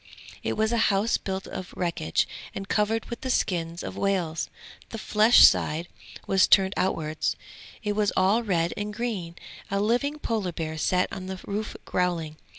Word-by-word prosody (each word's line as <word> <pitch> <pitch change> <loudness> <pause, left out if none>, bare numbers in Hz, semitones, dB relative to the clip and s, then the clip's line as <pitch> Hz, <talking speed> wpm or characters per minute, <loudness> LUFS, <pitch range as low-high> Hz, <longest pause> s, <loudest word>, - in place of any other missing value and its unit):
It - - -1
was 220 +1 +2
a 235 - +1
house 205 +3 +2
built 190 0 -4
of 185 - -7
wreckage 170 - 0 0.3
and 195 0 -5
covered 215 +2 +1
with 235 - -7
the 260 - -4
skins 170 -7 -1
of - - -6
whales; 180 -5 0 0.4
the 225 - -6
flesh 215 +2 +5
side 160 +3 +3 0.4
was 195 -1 +4
turned 190 -1 +5
outwards; 155 -4 -1 0.5
it 210 -1 0
was 210 -1 +2
all 195 +5 +4
red 175 -6 0
and 210 0 -4
green; 205 -7 -4 0.3
a 200 - 0
living 245 +8 +1
Polar 215 - -2
bear 160 -1 -4
sat 180 +3 +2
on 185 0 -6
the 190 -1 -5
roof 210 +2 -4
growling. 170 -4 -1
195 Hz, 165 wpm, -26 LUFS, 175-215 Hz, 0.5 s, flesh